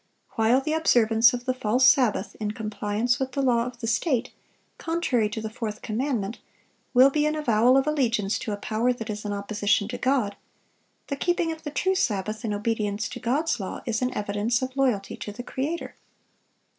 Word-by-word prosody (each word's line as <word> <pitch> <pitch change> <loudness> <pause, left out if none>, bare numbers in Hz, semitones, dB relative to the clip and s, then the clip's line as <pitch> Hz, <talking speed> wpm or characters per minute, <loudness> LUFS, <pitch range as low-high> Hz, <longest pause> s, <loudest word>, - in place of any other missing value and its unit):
While 230 +4 +3
the 310 +3 -2
observance 235 -7 +4
of 245 -1 -5
the 255 - +1
false 250 +1 +2
sabbath 220 -7 +3
in 210 -1 -2
compliance 215 +1 -1
with 265 -1 -3
the 275 - 0
law 240 -2 +2
of 245 -1 -9
the - - -3
state, 245 +1 0 0.5
contrary 300 -10 0
to 220 +1 -5
the 220 - -3
fourth 220 -2 -5
commandment, 225 -2 -2 0.6
will 260 +2 +7
be 300 +1 +2
an 305 - 0
avowal 250 -3 +3
of 270 - +2
allegiance 240 -9 0
to 215 - -4
a 205 - -2
power 225 +4 0
that 225 -2 -5
is 210 0 -6
in 205 - -2
opposition 205 0 0
to - - -5
God, 255 -7 +1 0.7
the 280 - -3
keeping 350 +2 0
of 320 0 -7
the 300 - -5
true 375 +6 0
Sabbath, 215 - -1
in 220 - -2
obedience 210 0 -1
to - - -7
God's 285 +3 0
law, 190 - -5
is 225 0 -1
an 250 0 0
evidence 210 +4 0
of 260 0 -4
loyalty 250 -8 0
to 210 - -6
the 245 +4 -8
Creator. 295 +7 -4
235 Hz, 195 wpm, -25 LUFS, 210-265 Hz, 0.7 s, will